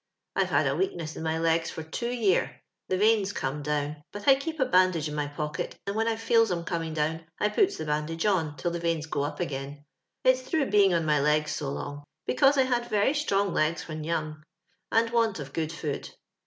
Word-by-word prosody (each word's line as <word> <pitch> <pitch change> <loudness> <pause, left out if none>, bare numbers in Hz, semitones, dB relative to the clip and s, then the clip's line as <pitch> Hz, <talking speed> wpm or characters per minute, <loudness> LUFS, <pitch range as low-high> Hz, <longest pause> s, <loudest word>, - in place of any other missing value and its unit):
I've - - +1
had - - +3
a - - +2
wealmess 170 - -2
in - - -6
my 160 0 -1
legs 165 0 +1
for 160 - -6
two 235 +9 -4
year; 225 -7 0 0.2
the 185 - 0
veins 210 -1 +3
comes 145 +1 -3
down, 150 0 -1
but 205 +4 -8
I 275 - +9
keep 320 +4 -3
a 260 - +4
bandage 185 -8 +3
in 150 - -5
my 150 -1 -1
podket, 150 +1 -4
and 200 - -3
when 225 +1 +1
I 225 - +1
ibels 225 0 +3
'em 170 -1 -1
■ - - -15
ooming 165 -2 -3
down, 160 +1 -1
I 210 - +2
puts 375 - +2
the 155 - -4
bandage 155 +3 -2
on 165 -8 +1
till 170 +6 -1
the 170 - -3
veins 165 -2 -1
goes 145 -2 -1
up - - -8
again 145 -3 -4 0.4
4t'8 255 0 +5
through 280 - -1
being 200 -3 +5
on 165 -1 +1
my 150 -1 +3
legs 150 +1 +2
80 150 - -4
long 145 +1 -5 0.2
(becanse 280 +1 +4
I 265 - +6
had 240 -2 -1
veiy 215 +6 +2
strong 200 - +1
legs 155 +2 0
when 155 -1 -5
young) 155 -1 -3 0.5
and 225 +1 +3
want 230 -3 +2
of 140 -3 -8
oood 160 -1 -1
food. 155 -4 -4
165 Hz, 225 wpm, -27 LUFS, 150-220 Hz, 0.5 s, I